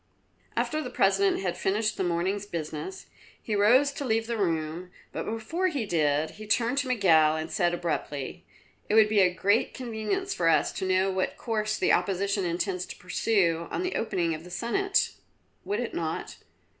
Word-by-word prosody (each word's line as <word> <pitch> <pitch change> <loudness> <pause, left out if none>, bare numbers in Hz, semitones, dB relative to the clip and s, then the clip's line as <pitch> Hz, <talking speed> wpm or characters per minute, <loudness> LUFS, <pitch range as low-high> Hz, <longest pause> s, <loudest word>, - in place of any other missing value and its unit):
After 310 - 0
the 250 - -5
President 195 -3 +2
had 180 -2 -2
finished 215 +3 0
the - - -1
morning's 185 +4 -1
business, 160 - -5 0.3
he 220 - -4
rose 250 +8 +5
to 280 - -5
leave 225 -3 +1
the 235 0 -2
room, 170 -3 -2 0.2
but - - -4
before 225 +12 -1
he 285 -10 -2
did 155 -4 +1
so - - -14
he 215 0 -9
turned 235 +5 +2
to 280 - -1
Miguel 160 -10 +4
and 160 +1 -4
said 175 -2 +1
abruptly: 165 -1 -4 0.5
"It 210 - +2
would 220 -1 +6
be 215 -1 +3
a 185 -2 +5
great 200 +4 +1
convenience 250 - -2
for 165 -1 +2
us - - +3
to 190 - -3
know 185 +1 +2
what 185 0 -1
course 215 -2 -1
the - - +2
Opposition 200 0 +1
intends 180 +1 -2
to - - -8
pursue 180 -3 +1
on - - -2
the 365 - -2
opening 175 -7 0
of 155 +1 -6
the 180 - -11
Senate, 390 - 0 0.5
would 205 +2 -1
it 245 - -3
not?" 160 -1 -4
195 Hz, 185 wpm, -27 LUFS, 175-225 Hz, 0.5 s, would